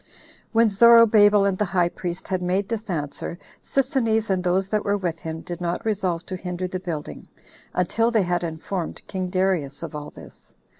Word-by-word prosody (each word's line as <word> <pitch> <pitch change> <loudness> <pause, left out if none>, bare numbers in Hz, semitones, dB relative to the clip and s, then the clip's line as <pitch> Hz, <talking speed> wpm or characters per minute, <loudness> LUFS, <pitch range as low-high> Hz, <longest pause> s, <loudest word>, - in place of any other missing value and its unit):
5. - - -33 0.5
When 230 0 +5
Zorobabel 210 -1 +6
and 190 -2 -1
the 210 - +2
high 175 -2 +1
priest 175 0 -5
had 185 -2 -1
made 185 +2 0
this 225 -2 -4
answer, 155 0 -4 0.2
Sisinnes, 230 -6 0
and 185 -1 0
those 185 +1 +1
that 210 0 0
were 205 0 +1
with 170 -4 -3
him, 160 0 -6
did 175 +1 -7
not 175 +3 -2
resolve 185 -6 -1
to 185 - -5
hinder 180 0 -4
the 185 0 -4
building, 165 -5 -6 0.5
until 225 +6 +1
they 225 -4 +2
had 175 0 -1
informed 165 +2 -4
king 185 -2 -4
Darius 185 -7 0
of - - -6
all 150 -1 -6
this. - - -15
185 Hz, 190 wpm, -24 LUFS, 175-210 Hz, 0.5 s, Zorobabel